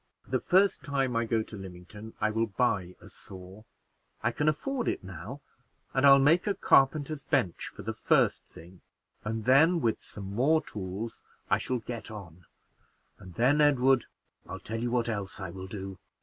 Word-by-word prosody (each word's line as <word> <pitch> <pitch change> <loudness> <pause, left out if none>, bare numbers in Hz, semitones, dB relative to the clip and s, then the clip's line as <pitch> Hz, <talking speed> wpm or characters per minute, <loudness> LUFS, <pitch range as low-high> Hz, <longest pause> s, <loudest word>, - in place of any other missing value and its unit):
The - - 0
first 190 +2 +3
time 135 -5 -1
I 115 0 +1
go 115 -1 0
to 110 - -11
Lymington 95 +3 -10
I 110 - +1
will 115 +1 0
buy 95 -4 -1
a - - -14
saw 95 +2 -12 0.6
I 120 - +2
can 150 +5 +1
afford 250 - -2
it - - -1
now; 95 - -8 0.5
and 135 +1 +4
I'll 135 0 +9
make 155 +8 +4
a 200 - +1
carpenter's 145 -2 +3
bench 90 -9 0
for - - -9
the - - -3
first - - +2
thing, 85 +2 -15 0.4
and 110 +1 -3
then, 160 +7 +5
with 115 -7 0
some 100 -1 -7
more 150 +8 +3
tools, 105 +2 -6 0.3
I - - +4
shall 130 - -1
get 115 0 -7
on; 90 -6 -10 0.7
and 90 -2 -12
then, 135 +6 +3
Edward, 135 -3 +4 0.4
I'll - - -6
tell 115 +1 -5
you 120 - -1
what 120 -1 +1
else 100 -4 -4
I 95 -3 -5
will 95 +1 -8
do." 95 -1 -7
115 Hz, 180 wpm, -29 LUFS, 95-140 Hz, 0.7 s, I'll